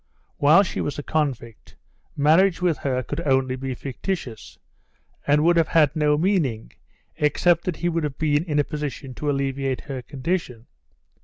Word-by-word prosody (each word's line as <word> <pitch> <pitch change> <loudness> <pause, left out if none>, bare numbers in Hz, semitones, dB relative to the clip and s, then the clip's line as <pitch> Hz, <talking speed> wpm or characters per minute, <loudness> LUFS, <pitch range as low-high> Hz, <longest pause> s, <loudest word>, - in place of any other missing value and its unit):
While 155 +7 +6
she 185 - -4
was 145 - -3
a 145 - -5
convict, 135 -8 -3 0.4
marriage 165 +6 +4
with 175 -4 0
her 130 -2 -1
could 120 - -5
only 130 -4 +1
be 130 0 -4
fictitious, 135 - -6 0.7
and 145 +1 +3
would 170 +1 +4
have 165 -2 +3
had 150 -4 +3
no 150 -1 +2
meaning 150 - 0 0.5
except 165 +3 +2
that 180 - -1
he 175 - -2
would 165 -1 -1
have 145 -2 -4
been 150 -1 +1
in 150 -4 -2
a 145 - +4
position 145 -3 -6
to 145 +5 -3
alleviate 135 -1 -1
her 135 -3 -6
condition. 130 -3 -4
145 Hz, 165 wpm, -23 LUFS, 135-165 Hz, 0.7 s, While